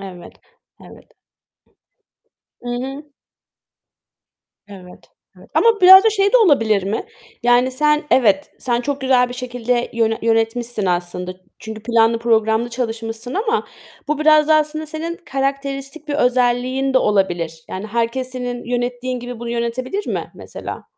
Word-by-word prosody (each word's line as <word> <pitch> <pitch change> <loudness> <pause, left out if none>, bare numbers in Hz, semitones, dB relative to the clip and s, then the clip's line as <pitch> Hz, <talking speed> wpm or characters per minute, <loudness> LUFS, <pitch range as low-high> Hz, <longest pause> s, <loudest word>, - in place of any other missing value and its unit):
Evet. 185 -3 -10 0.5
Evet. - - -16 1.5
I 245 - -9 0.2
hı. 275 +3 -7 1.7
Evet. 185 -3 -14 0.3
Evet. - - -18
Ama 450 -3 +3
biraz 380 +3 +9
da 445 - +5
şey 400 0 +1
de - - +7
olabilir 225 - +3
mi? 205 - -3 0.4
Yani, 245 +1 +3
sen 300 +3 +2
evet, 205 -7 +3
sen 240 -1 -1
çok 280 +2 -3
güzel 255 -2 +3
bir 245 - -7
şekilde 245 -1 -2
yöne 225 -1 0
yönetmişsin 225 -1 0
aslında. 180 0 -2 0.3
Çünkü 220 -1 -8
planlı 230 0 +2
programlı 225 0 +1
çalışmışsın 230 0 -4
ama 440 +3 -1 0.4
bu 300 0 0
biraz 305 0 +4
da 310 - +6
aslında 310 +1 0
senin 325 +2 -5
karakteristik 275 +1 -4
bir 290 - -2
özelliğin 255 +1 +1
de - - +6
olabilir. 175 -7 -1
Yani, 190 +3 -6
herkes 235 +3 -2
senin 245 -1 -5
yönettiğin 245 +1 -3
gibi 245 -1 -7
bunu 235 - -5
yönetebilir 245 - -3
mi - - -4
mesela? - - -8
245 Hz, 135 wpm, -19 LUFS, 225-275 Hz, 1.7 s, biraz